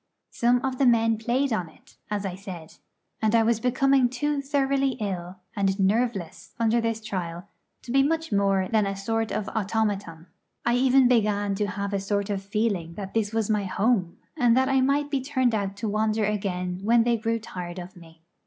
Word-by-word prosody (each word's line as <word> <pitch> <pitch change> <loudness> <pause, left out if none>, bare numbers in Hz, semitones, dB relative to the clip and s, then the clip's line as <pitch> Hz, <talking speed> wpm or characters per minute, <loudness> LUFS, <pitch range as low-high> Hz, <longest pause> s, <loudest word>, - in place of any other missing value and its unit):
Some 245 +2 +2
of 260 -1 -3
the 270 - +4
men 225 -2 +3
played 250 +3 0
on 180 -6 -2
it, - - -22
as 205 -1 -2
I 190 - -3
said. 180 -4 -9 0.4
And 220 +1 +2
I 225 - +5
was 225 0 +2
becoming 255 +1 +3
too 285 +3 -1
thoroughly 275 -1 +1
ill 190 -6 -4 0.2
and 195 -1 0
nerveless 200 -3 -1
under 230 +1 +2
this 230 -1 -2
trial 175 -4 -4 0.4
to 240 - -7
be 270 +2 +4
much 320 +2 0
more 195 -2 +2
than 215 -1 +2
a 195 - -2
sort 225 +3 -2
of 215 -1 -2
automaton. 200 -6 -2 0.4
I 235 - +3
even 260 0 +5
began 205 -4 +2
to 205 +1 -1
have 200 0 -4
a 200 - +1
sort 200 +1 -1
of 195 -1 -2
feeling 195 -5 -2
that 195 -2 -7
this 215 -2 0
was 225 -2 0
my 210 -2 0
home, 195 -2 0 0.2
and 240 -1 +3
that 260 +1 +3
I 265 -1 +3
might 285 +2 +1
be 275 -2 0
turned 260 -3 +1
out 200 -2 -1
to 205 +2 -4
wander 215 +1 +1
again 185 -3 -2
when 230 +3 +4
they 235 0 +2
grew 230 +1 -1
tired 180 -5 -7
of 180 0 -8
me. 165 -2 -16
215 Hz, 200 wpm, -25 LUFS, 195-245 Hz, 0.4 s, I